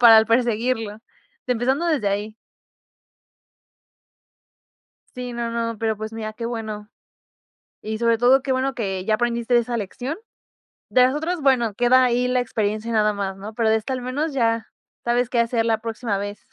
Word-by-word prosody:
para 230 Hz, -2 st, +9 dB
l 220 Hz, -, +4 dB
perseguirlo. 230 Hz, -2 st, 0 dB, 0.5 s
Empezando 255 Hz, +6 st, +1 dB
desde 295 Hz, -11 st, +1 dB
ahí. 205 Hz, +2 st, -3 dB, 2.8 s
Sí, 250 Hz, -1 st, -5 dB
no 235 Hz, -1 st, -3 dB
no, 230 Hz, -1 st, -2 dB
pero, 220 Hz, 0 st, -1 dB
pues, 220 Hz, +1 st, -6 dB
mira, 215 Hz, -1 st, -5 dB
qué 230 Hz, -, -4 dB
bueno. 215 Hz, -3 st, -5 dB, 0.9 s
Y, 220 Hz, 0 st, -4 dB
sobre 230 Hz, 0 st, +2 dB
todo, 255 Hz, +3 st, +4 dB
qué 270 Hz, -, -1 dB
bueno 260 Hz, +1 st, 0 dB
que 195 Hz, -5 st, -3 dB
ya 220 Hz, -, +2 dB
aprendiste 235 Hz, +1 st, +1 dB
esa 235 Hz, 0 st, 0 dB
lección. 245 Hz, -, -4 dB, 0.7 s
De 250 Hz, -, +5 dB
las 255 Hz, -, +3 dB
otras, 325 Hz, +4 st, -2 dB
bueno, 245 Hz, -6 st, +2 dB
queda 250 Hz, +2 st, +5 dB
ahí 250 Hz, 0 st, +2 dB
la 250 Hz, 0 st, +2 dB
experiencia 215 Hz, -1 st, -2 dB
nada 215 Hz, -1 st, +3 dB
más, 195 Hz, -1 st, -3 dB
¿no? 210 Hz, +3 st, -8 dB
Pero 225 Hz, 0 st, +1 dB
de 220 Hz, -, +4 dB
esta 220 Hz, +4 st, -2 dB
al 255 Hz, -, -3 dB
menos 280 Hz, +5 st, -2 dB
ya 230 Hz, -3 st, +1 dB, 0.4 s
sabes 240 Hz, 0 st, +1 dB
qué 240 Hz, -, +1 dB
hacer 230 Hz, -1 st, +1 dB
la 225 Hz, -1 st, +1 dB
próxima 225 Hz, -2 st, -2 dB
vez. 205 Hz, +1 st, -5 dB
230 Hz, 170 wpm, -23 LUFS, 215-250 Hz, 2.8 s, para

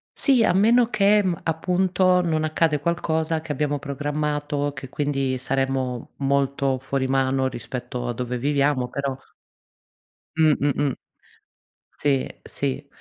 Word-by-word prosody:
Sì, 260 Hz, -5 st, +5 dB
a -, -, +4 dB
meno 230 Hz, +5 st, +4 dB
che, 205 Hz, 0 st, +4 dB
mhmm, 175 Hz, -3 st, -1 dB
appunto, 180 Hz, +2 st, +2 dB
non 160 Hz, -2 st, 0 dB
accade 155 Hz, -1 st, +1 dB
qualcosa 160 Hz, 0 st, -1 dB
che 160 Hz, -2 st, -6 dB
abbiamo 145 Hz, +1 st, -1 dB
programmato, 145 Hz, 0 st, -2 dB
che 135 Hz, -2 st, -8 dB
quindi 135 Hz, -3 st, -1 dB
saremmo 130 Hz, -1 st, -2 dB
molto 140 Hz, -1 st, 0 dB
fuori 135 Hz, 0 st, -2 dB
mano, 135 Hz, 0 st, +1 dB
rispetto 125 Hz, 0 st, -5 dB
a 120 Hz, -, -1 dB
dove 125 Hz, +1 st, -3 dB
viviamo, 140 Hz, -1 st, +1 dB
però 140 Hz, 0 st, -3 dB, 1.2 s
Mh-mh-mh. 145 Hz, -3 st, +2 dB, 1.0 s
Sì, 140 Hz, -3 st, 0 dB
sì. 140 Hz, +1 st, -3 dB
145 Hz, 120 wpm, -23 LUFS, 135-160 Hz, 1.2 s, Sì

